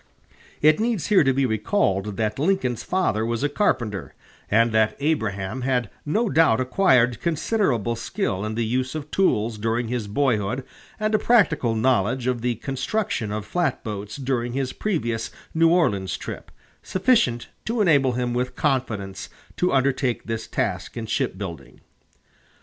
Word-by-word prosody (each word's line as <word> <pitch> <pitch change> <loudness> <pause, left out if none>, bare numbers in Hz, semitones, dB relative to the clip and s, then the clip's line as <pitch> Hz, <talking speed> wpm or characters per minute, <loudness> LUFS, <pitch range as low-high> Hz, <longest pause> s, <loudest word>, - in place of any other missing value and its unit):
It 155 +3 +5
needs 225 -5 0
here 205 -6 +6
to 135 - +3
be 135 +1 +1
recalled 105 - 0
that 110 +1 -1
Lincoln's 150 - +1
father 180 - 0
was 115 +2 -2
a 145 - +2
carpenter, 110 - -1 0.3
and 115 +2 +4
that 110 0 +2
Abraham 110 -7 -1
had 125 -4 0 0.2
no 220 +10 +1
doubt 160 - +4
acquired 125 - +3
considerable 155 - 0
skill 115 - -2
in 110 0 -3
the 115 0 0
use 130 +4 -1
of 150 -1 -6
tools 115 - +1
during 115 +2 -1
his 120 -4 -2
boyhood 120 0 0 0.4
and 215 0 0
a 215 - +4
practical 165 - +3
knowledge 120 +1 +1
of 125 -2 0
the 120 0 0
construction 135 - -2
of 105 0 -3
flatboats 110 - -2
during 125 -3 -2
his 135 -1 -2
previous 120 - -2 0.2
New 165 0 +4
Orleans 100 - +1
trip, - - -7 0.3
sufficient 185 - +1 0.2
to 230 +1 -1
enable 145 -10 +4
him 120 0 -1
with 125 +1 -2
confidence 110 -9 -2 0.3
to 180 - +2
undertake 130 -3 +1
this 115 -1 -4
task - - -2
in 115 - -3
shipbuilding. 85 - -4
125 Hz, 150 wpm, -24 LUFS, 110-155 Hz, 0.4 s, here